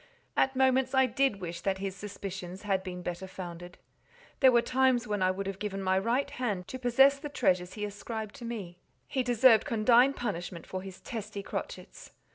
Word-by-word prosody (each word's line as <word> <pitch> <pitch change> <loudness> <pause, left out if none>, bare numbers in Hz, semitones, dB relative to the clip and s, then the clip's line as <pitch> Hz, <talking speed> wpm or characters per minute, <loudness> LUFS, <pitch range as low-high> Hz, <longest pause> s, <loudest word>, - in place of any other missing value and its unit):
At 265 0 +2
moments 260 0 +3
I 265 0 +6
did 255 -4 0
wish 170 -1 -5
that 190 +1 0
his 195 0 -4
suspicions 190 -2 -7
had 195 -2 +1
been 180 -1 -7
better 175 +2 -4
founded. 175 -1 -8 0.6
There 260 -2 +7
were 235 -1 +4
times 255 -2 +2
when 205 -2 -1
I 185 - +4
would 195 +1 -2
have 195 0 -5
given 195 -2 -3
my 190 0 +2
right 240 +7 +1
hand 205 -8 -3
to 260 - -6
possess 270 +3 +5
the 295 +1 -6
treasures 180 -9 +1
he 210 -1 -3
ascribed 215 +1 -6
to 250 - -10
me. 200 -7 -6 0.3
He 265 - 0
deserved 245 -2 +5
condign 240 +4 +4
punishment 180 -8 -4
for 185 - -5
his 190 -1 -10
testy 210 -3 -6
crotchets. - - -7
210 Hz, 190 wpm, -30 LUFS, 185-250 Hz, 0.6 s, There